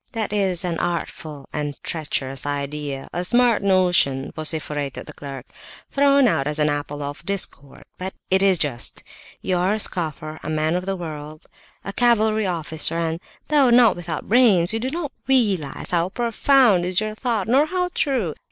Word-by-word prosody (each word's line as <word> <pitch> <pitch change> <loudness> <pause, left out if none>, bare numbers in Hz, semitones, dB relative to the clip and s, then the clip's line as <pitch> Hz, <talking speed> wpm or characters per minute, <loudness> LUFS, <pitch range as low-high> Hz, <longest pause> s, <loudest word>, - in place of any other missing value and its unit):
"That 220 -2 -2
is 190 -4 +2
an 170 -2 -2
artful 155 -4 -4
and 150 -1 -3
traitorous 135 -4 -3
idea. 145 -1 -4
A 175 - -2
smart 240 +3 +3
notion," 180 -9 +2
vociferated 150 -3 -2
the - - -10
clerk, 135 -3 -8 0.5
"thrown 280 -1 +4
out 140 -10 +1
as 150 +1 -1
an 150 -1 +3
apple 145 0 -3
of 145 +1 -6
discord. 175 -8 -3 0.2
But 190 +1 -5 0.2
it 190 0 +4
is 195 -2 +4
just. 140 -7 -1 0.4
You 185 -1 0
are 185 +4 +1
a - - -3
scoffer, 155 -5 -3
a - - -6
man 155 +1 0
of 180 +1 -3
the 195 - -1
world, 155 -3 -8 0.4
a 195 - -5
cavalry 220 -3 +2
officer, 160 -2 -1
and, 165 0 -1 0.3
though 290 -4 +4
not 240 -1 +6
without 170 -2 -5
brains, 210 -6 +4
you 225 - -1
do 255 +3 -2
not 305 -1 -4 0.2
realize 205 - 0
how 175 0 +1
profound 235 -2 +3
is 180 0 +2
your 215 0 -2
thought, 225 -3 -2
nor 270 +6 +4
how 360 +1 -1
true. 240 - 0
180 Hz, 170 wpm, -22 LUFS, 150-220 Hz, 0.5 s, not